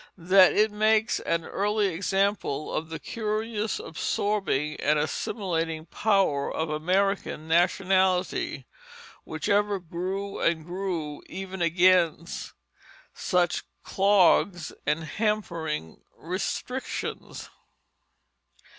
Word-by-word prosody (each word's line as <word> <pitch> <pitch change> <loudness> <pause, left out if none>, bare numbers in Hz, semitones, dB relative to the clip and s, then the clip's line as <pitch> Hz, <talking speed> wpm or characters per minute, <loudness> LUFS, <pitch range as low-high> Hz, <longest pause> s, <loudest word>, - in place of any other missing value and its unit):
that 185 +2 +6
it 215 +1 +3
makes 215 +1 +2
an 165 -1 -1
early 205 0 0
example 195 -4 -1
of 160 +1 -3
the 160 - -4
curious 215 0 -2
absorbing 160 -4 -1
and 150 +1 +2
assimilating 165 +1 -2
power 195 -9 +1
of 160 -1 -2
American 180 0 0
nationality, 185 +2 +1 0.6
which - - -5
ever 205 0 +2
grew 185 +4 -4
and 165 -2 +1
grew 175 -5 -4
even 190 -1 -6
against 170 -1 +2 0.6
such 180 -3 0 0.2
clogs 190 -3 +3
and 155 +2 +1
hampering 170 - -2 0.2
restrictions. 195 +9 -4
185 Hz, 90 wpm, -27 LUFS, 165-200 Hz, 0.6 s, that